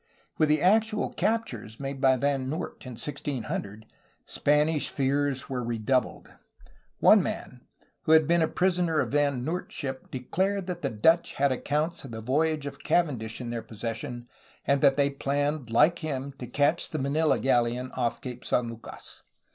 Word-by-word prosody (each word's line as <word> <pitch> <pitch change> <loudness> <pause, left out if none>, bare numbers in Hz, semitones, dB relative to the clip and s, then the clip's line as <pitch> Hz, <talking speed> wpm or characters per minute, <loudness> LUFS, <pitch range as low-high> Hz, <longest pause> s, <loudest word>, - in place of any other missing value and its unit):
With 155 -1 +4
the 150 +1 +3
actual 215 +3 +2
captures 210 - -2
made 135 -1 -5
by 130 -1 +5
Van 135 0 0
Noort 160 +5 -5
in 125 - -6
1600, 115 -5 -4 0.4
Spanish 150 +1 +2
fears 140 0 0
were 125 -2 -3
redoubled. 120 +2 -1 0.6
One - - +6
man, - - -5 0.4
who 160 - +5
had 160 -2 +6
been 170 0 +3
a 160 - +3
prisoner 175 -3 +1
on - - 0
Van 140 -3 +1
Noort's 175 +4 -4
ship, 135 -1 -5
declared 190 +9 -1
that 175 -1 -5
the 140 - 0
Dutch 160 +10 +3
had 140 0 +2
accounts 150 +6 -1
of 135 - -8
the 110 -1 -6
voyage 150 +5 0
of 140 0 -6
Cavendish 125 -10 0
in 120 -2 -5
their 115 -1 -3
possession 115 +3 -6 0.4
and 140 -1 +2
that 140 -1 +5
they 140 0 +3
planned 145 -1 -1
like 160 +9 +4
him 140 -3 -4
to 125 - -6
catch 145 +6 +1
the 155 - -3
Manila 150 +3 +1
galleon 125 0 +1
off 120 -2 -2
Cape 125 -1 -7
San 120 -1 0
Lucas. 115 0 -10
140 Hz, 165 wpm, -27 LUFS, 125-155 Hz, 0.6 s, One